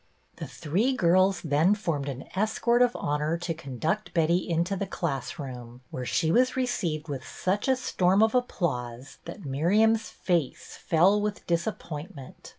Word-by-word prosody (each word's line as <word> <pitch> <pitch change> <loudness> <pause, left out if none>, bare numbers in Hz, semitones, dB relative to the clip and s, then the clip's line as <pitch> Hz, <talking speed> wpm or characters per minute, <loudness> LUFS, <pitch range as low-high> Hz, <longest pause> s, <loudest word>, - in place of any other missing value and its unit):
The - - -6
three 200 - 0
girls 185 -1 +3
then 160 +6 +3
formed 160 -9 -2
an 135 -1 -6
escort 220 +4 +2
of 245 -1 +3
honor 150 +3 -1
to 170 -1 -3
conduct 160 - -3
Betty 170 +2 +2
into 170 +4 0
the 195 +1 -3
class 135 -9 -3
room, 125 -3 -8
where 125 -1 -5
she 160 - +1
was 255 +7 +3
received 175 -12 -1
with 135 -3 -5
such 190 - -2
a 265 - +4
storm 195 -5 +2
of 220 - +2
applause 135 - -2
that 170 +2 -9
Miriam's 210 +11 +2
face 170 -7 -2
fell 185 +6 +3
with 210 0 -3
disap 170 +5 0
pointment. 150 -4 -9
170 Hz, 155 wpm, -27 LUFS, 145-205 Hz, -, a